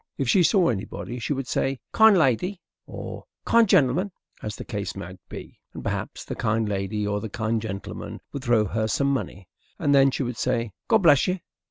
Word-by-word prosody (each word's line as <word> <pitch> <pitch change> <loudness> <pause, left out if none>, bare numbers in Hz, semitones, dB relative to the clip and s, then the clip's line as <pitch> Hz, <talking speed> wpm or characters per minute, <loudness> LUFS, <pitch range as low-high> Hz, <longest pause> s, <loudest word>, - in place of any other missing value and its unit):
If 135 - -1
she 180 - +5
saw 180 0 +4
anybody 120 +3 -4
she 120 - -3
would 135 -2 -1
say 135 -1 -1
"Kind 220 -3 +6
lady," 170 - +1 0.3
or - - -7 0.2
"Kind 230 -3 +4
gentleman," 155 +9 +3 0.3
as 105 0 -4
the - - -8
case 105 -4 -4
might 95 -1 -8
be, - - -9 0.2
and - - -7
perhaps - - -4
the - - -4
kind 110 +1 0
lady 105 +1 -2
or 105 0 -1
the 110 - -5
kind 110 +1 -1
gentleman 100 -3 -6
would 140 - -5
throw 120 -4 +3
her 110 +2 -1
some 140 +5 +1
money, 95 -6 -4 0.3
and 145 - +2
then 135 0 +6
she 135 - -2
would 120 -2 -4
say 115 -2 -1 0.2
"God 220 -3 +4
bless 145 -5 +6
you." 185 +1 0
120 Hz, 200 wpm, -25 LUFS, 105-145 Hz, 0.3 s, Kind